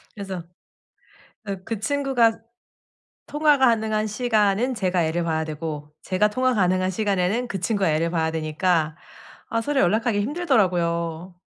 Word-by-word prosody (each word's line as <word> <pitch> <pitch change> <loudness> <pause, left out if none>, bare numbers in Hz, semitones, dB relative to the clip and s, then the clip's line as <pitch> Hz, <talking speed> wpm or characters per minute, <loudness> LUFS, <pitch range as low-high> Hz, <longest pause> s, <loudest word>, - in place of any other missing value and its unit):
그래서 190 -4 -6 1.0
어 200 -1 -3
그 225 -3 -4
친구가 250 -3 +2 0.9
통화 295 0 +3
가능한 220 -4 +2
시간은 220 +1 +1
제가 185 -4 0
애를 165 +2 -1
봐야 160 -1 -1
되고 150 -1 -6
제가 200 +3 +1
통화 255 +2 +1
가능한 185 -2 +2
시간에는 200 +4 0
그 195 -5 -4
친구가 200 -4 +1
애를 165 +2 0
봐야 160 -2 0
되니까 160 0 0 0.5
아 230 0 0
서로 285 +3 0
연락하기 215 +3 +2
힘들더라고요. 180 - 0
195 Hz, 310 characters per minute, -23 LUFS, 170-230 Hz, 1.0 s, 통화